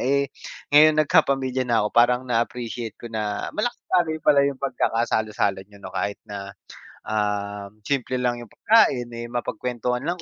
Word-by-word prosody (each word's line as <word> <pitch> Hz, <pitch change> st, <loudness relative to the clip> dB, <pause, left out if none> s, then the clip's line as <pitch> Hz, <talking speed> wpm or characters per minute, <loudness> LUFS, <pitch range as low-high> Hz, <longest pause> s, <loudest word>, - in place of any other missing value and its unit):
eh 140 Hz, +2 st, +2 dB, 0.5 s
ngayon 155 Hz, +1 st, +7 dB
nag -, -, -20 dB
kapamilya 130 Hz, -5 st, +2 dB
na 115 Hz, -3 st, +3 dB
ako -, -, +1 dB
parang 125 Hz, +2 st, +4 dB
na 120 Hz, -2 st, +1 dB
appreciate 120 Hz, -2 st, -5 dB
ko 115 Hz, -1 st, -10 dB
na 105 Hz, -2 st, -3 dB
malaki 185 Hz, -7 st, 0 dB
pala 145 Hz, -2 st, +6 dB
'yung 140 Hz, -1 st, +1 dB
pag-kakasalo-salo 110 Hz, -6 st, 0 dB
niyo 100 Hz, -, -17 dB
'no, -, -, -7 dB
kahit 100 Hz, +2 st, -2 dB
na, 100 Hz, -1 st, -7 dB, 0.6 s
ah, 105 Hz, -1 st, -2 dB
simple 130 Hz, 0 st, -1 dB
lang 120 Hz, -1 st, 0 dB
'yung 120 Hz, -3 st, -11 dB
pagkain, 135 Hz, -, +3 dB
eh, 120 Hz, -, -5 dB
mapag-kwentuhan 125 Hz, +1 st, -2 dB
lang 175 Hz, +1 st, -2 dB
120 Hz, 160 wpm, -24 LUFS, 110-140 Hz, 0.6 s, ngayon